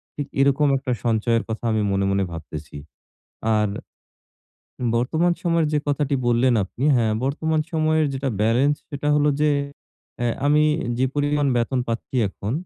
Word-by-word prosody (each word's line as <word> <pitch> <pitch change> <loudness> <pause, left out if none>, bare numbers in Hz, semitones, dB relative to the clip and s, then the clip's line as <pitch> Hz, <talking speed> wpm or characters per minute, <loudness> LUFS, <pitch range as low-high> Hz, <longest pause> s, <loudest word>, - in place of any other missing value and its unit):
ঠিক 145 -1 -4
এরকম 140 +2 +3
১ 135 - -2
টা - - +1
সঞ্চয়ের 115 0 +1
কথা 110 - -4
আমি 110 -1 +1
মনে, 100 0 +1
মনে 100 0 +1
ভাবতেছি। 80 -2 -8 0.8
আর। 105 -1 +1 1.3
বর্তমান 160 +9 +1
সময়ের 170 -2 +2
যে - - +3
কথাটি 145 0 0
বললেন 120 +1 +3
আপনি, 120 +8 -5
হ্যাঁ, 110 -2 +2
বর্তমান 155 +3 0
সময়ের 155 -1 +2
যেটা 135 0 -2
বেলেন্স, 125 +7 +3 0.2
সেটা 145 +1 -3
হলো 150 0 +3
যে, 150 - +3 0.7
অ্যা 120 - -1 0.2
আমি 150 +1 +4 0.4
যে 130 - +3
পরিমাণ 145 0 +1
বেতন 125 +2 0
পাচ্ছি 115 +3 -4
এখন, 100 +3 -5
135 Hz, 150 wpm, -22 LUFS, 115-150 Hz, 1.3 s, আমি